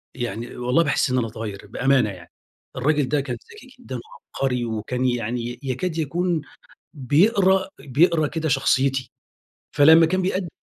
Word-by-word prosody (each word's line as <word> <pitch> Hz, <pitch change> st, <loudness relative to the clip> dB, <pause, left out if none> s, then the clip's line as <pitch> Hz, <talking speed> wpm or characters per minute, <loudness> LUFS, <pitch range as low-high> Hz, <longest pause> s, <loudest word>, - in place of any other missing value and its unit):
يعني 120 Hz, -1 st, -5 dB
والله 125 Hz, +7 st, +2 dB
باحس 140 Hz, -2 st, +1 dB
إن 125 Hz, -1 st, +2 dB
باتغيّر 110 Hz, -3 st, -6 dB
بأمانة 130 Hz, 0 st, +2 dB
يعني. 90 Hz, -3 st, -11 dB, 0.5 s
الرَّاجل 145 Hz, 0 st, +1 dB
ده 145 Hz, -1 st, +1 dB
كان 125 Hz, -3 st, -5 dB, 0.2 s
ذكي 270 Hz, -11 st, -15 dB
جدًا 130 Hz, -, -8 dB, 0.4 s
وعبقري 125 Hz, -3 st, 0 dB
وكان 115 Hz, +3 st, -3 dB
يعني 120 Hz, 0 st, -2 dB
يكاد 155 Hz, +6 st, -3 dB
يكون 165 Hz, +2 st, -1 dB, 0.5 s
بيقرا 190 Hz, -, +3 dB
بيقرا 155 Hz, +3 st, +2 dB
كده 160 Hz, -1 st, -3 dB
شخصيتي. 135 Hz, -2 st, +1 dB, 0.7 s
فلمّا 160 Hz, +3 st, +7 dB
كان 185 Hz, +3 st, 0 dB
بيأد 185 Hz, -1 st, -1 dB
135 Hz, 135 wpm, -23 LUFS, 120-165 Hz, 0.7 s, فلمّا